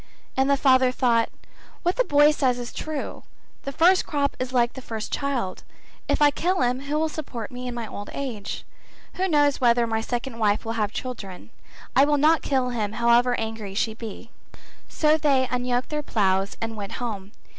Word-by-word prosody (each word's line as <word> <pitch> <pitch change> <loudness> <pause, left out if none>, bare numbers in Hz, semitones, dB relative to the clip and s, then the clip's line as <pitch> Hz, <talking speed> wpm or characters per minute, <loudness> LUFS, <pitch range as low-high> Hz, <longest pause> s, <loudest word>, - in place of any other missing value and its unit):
And 265 +1 +2
the 280 - +4
father 260 -2 +4
thought 235 -3 +2 0.5
'What 355 +1 +1
the - - +4
boy 295 -6 +5
says 260 -5 +1
is 245 -1 -6
true; 310 -2 -5 0.4
the 275 - -3
first 355 +6 +4
crop 285 -2 0
is 255 0 -3
like 240 -2 +2
the 260 - -8
first 220 -3 -6
child, 265 -9 -2 0.5
if - - +2
I 290 - +6
kill 365 +5 0
him 250 +1 +1
who 285 +2 -2
will 320 +1 +1
support 270 -8 -6
me 250 0 -6
in 245 - -4
my 235 -1 -4
old 205 -1 -7
age? 235 -8 -5 0.5
Who 375 +1 +1
knows 290 -5 +2
whether 240 -1 +4
my 225 -1 -1
second 240 +1 -4
wife 210 -1 +1
will 225 - -2
have 215 -3 -1
children. 205 -9 -7 0.4
I 270 - +7
will 295 0 +2
not 310 +2 +4
kill 260 -3 0
him 215 -4 -2
however 235 +2 +3
angry 220 -3 -5
she 220 +1 0
be;' 225 +1 -9 0.6
so 305 0 +3
they 270 -3 +2
unyoked 250 0 -1
their 300 -1 -2
ploughs 195 -6 0
and 225 0 -4
went 200 -2 -6
home. 205 -5 -5
250 Hz, 190 wpm, -24 LUFS, 225-285 Hz, 0.6 s, I